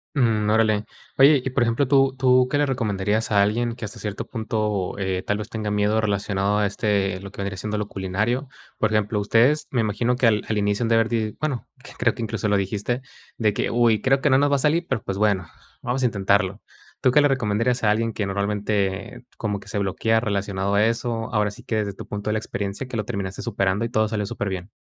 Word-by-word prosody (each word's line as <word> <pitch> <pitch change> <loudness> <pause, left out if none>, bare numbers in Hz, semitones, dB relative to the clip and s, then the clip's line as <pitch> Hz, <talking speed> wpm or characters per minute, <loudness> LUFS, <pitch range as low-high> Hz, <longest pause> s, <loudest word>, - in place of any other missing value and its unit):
Mm, 110 -6 +2
órale. 110 -1 +3 0.3
Oye, 140 0 +6
y - - 0
por 130 -1 +2
ejemplo, 120 +4 +1
¿tú 135 0 +4
tú 130 -1 +4
qué 145 - +2
le 145 - +3
recomendarías 110 -5 -1
a 100 -1 +5
alguien 115 +3 +1
que 120 -2 -6
hasta 105 - -7
cierto 105 -2 -5
punto, 105 -5 -2
eh, 95 -1 -1
tal 105 - -1
vez, 105 +1 -6
tenga 110 -2 -3
miedo 105 +1 +2
relacionado 100 -1 0
a 105 - +2
este 100 -3 0
lo 100 0 -9
que - - -17
vendría 100 -1 -3
siendo 105 +3 -3
lo 105 -1 -2
culinario? 105 +8 -2 0.3
Por 110 - +1
ejemplo, 105 -1 +1
ustedes, 120 +8 +3
me 125 - 0
imagino 115 +3 0
que 125 - +3
al 105 -2 +3
al 110 - 0
inicio 105 +2 +1
han 115 - 0
de 115 - +4
haber, 115 0 +3
di 110 -2 -2
bueno, 145 -5 -2 0.3
creo 115 -2 +2
que - - -7
incluso 110 -1 -2
lo 100 - +3
dijiste, 105 +6 -2 0.4
de 105 -3 +2
que, - - -1
uy, 115 -3 +3
creo 135 +3 +3
que 145 - +2
no 130 - +5
nos 145 +1 +2
va 140 - +4
a - - -2
salir, 160 +5 +2
pero, 125 -5 0
pues 95 - -4
bueno, 100 -4 +1 0.3
vamos 125 +2 -2
a - - +4
intentarlo, 100 -1 +1 0.4
¿tú 130 - +3
qué 150 - +5
le 145 - +4
recomendarías 120 0 0
a 105 - +5
alguien 115 +2 0
que 105 -1 -2
normalmente, 100 +2 -2
como 105 -3 -2
que - - -13
se 105 - -3
bloquea 110 +3 +1
relacionado 100 -3 -1
a 105 +1 +4
eso?, 115 0 -2
ahora 105 -2 +1
sí - - -13
que 110 - -2
desde 105 -2 -1
tu - - -9
punto 105 +1 -4
de - - +1
la 110 - +1
experiencia, 100 +2 -4
que 120 - -4
lo 105 - -2
terminaste 100 -4 -4
superando 100 -1 0
y - - -3
todo 110 -2 +1
salió 105 -2 -2
superbién. 100 -3 -4
110 Hz, 235 wpm, -23 LUFS, 100-120 Hz, 0.4 s, Oye